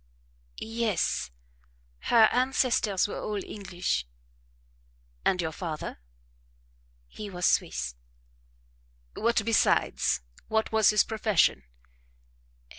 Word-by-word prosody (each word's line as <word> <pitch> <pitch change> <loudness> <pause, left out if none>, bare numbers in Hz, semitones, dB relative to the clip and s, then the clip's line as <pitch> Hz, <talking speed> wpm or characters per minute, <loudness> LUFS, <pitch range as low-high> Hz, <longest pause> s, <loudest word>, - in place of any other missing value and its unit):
"Yes 220 - -1 0.8
her 225 -2 +6
ancestors 250 -6 +2
were - - -5
all 205 -2 -3
English." 185 - -3 1.2
"And 180 - +2
your 160 -2 -1
father?" 160 - -5 1.1
"He 205 - -8
was 180 -2 -3
Swiss." 65 -1 +1 1.2
"What 230 -1 +1
besides? 70 - +2 0.3
What 220 0 0
was 220 -1 +5
his 210 -1 +5
profession?" 210 - +1
205 Hz, 85 wpm, -28 LUFS, 170-220 Hz, 1.2 s, her